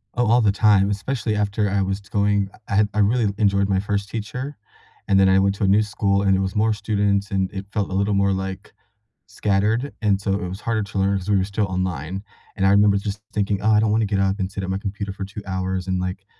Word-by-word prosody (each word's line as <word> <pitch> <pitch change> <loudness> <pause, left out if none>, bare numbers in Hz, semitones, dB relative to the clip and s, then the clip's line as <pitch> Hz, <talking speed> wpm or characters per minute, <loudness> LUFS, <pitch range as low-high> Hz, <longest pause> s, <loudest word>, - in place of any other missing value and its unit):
Oh, 120 -1 +1
all 120 +3 +4
the 105 -3 +3
time, 100 -1 +4
especially 110 +2 -2
after 105 0 0
I 100 0 +1
was 95 +1 -2
going 100 0 0 0.2
I 100 - -2
had 105 +1 +3
I 105 - -1
really 105 0 +2
enjoyed 100 -2 +2
my 95 -1 +2
first 100 0 -2
teacher, 125 +6 -5 0.5
and 100 - +3
then 95 0 +5
I 95 0 +5
went 100 0 +2
to 100 - -4
a - - +3
new 100 +3 +4
school, 100 -2 0
and 95 -1 +3
it 95 - 0
was 95 0 -2
more 110 +1 +2
students, 100 -1 0
and 95 -1 0
it 95 -1 -5
felt 105 -3 -1
a - - -5
little 100 +2 +1
more, 100 0 +2
like, 95 0 -5 0.5
scattered, 105 +6 0
and 100 -3 +2
so 100 0 -1
it 95 -3 -2
was 95 - -6
harder 115 -2 -1
to 100 -1 -4
learn 100 +1 +2
'cause 95 +1 -6
we 100 - +4
were 95 - +1
still 100 +1 -1
online, 95 0 -3 0.3
and 95 - +1
I - - +5
remember 100 0 +5
just 100 +1 -4
thinking, 100 -1 0
"Oh, 110 - +2
I 105 - +5
don't 110 -1 +2
wanna 110 +1 +2
get 100 -1 -1
up 95 +1 +1
and 95 0 -2
sit 100 -1 -5
at 95 - -4
my 95 - -1
computer 100 0 -5
for 100 0 -6
2 100 +2 -8
hours 95 0 -2
and, 95 -1 0
like, 90 +1 -4
100 Hz, 260 wpm, -22 LUFS, 95-105 Hz, 0.5 s, then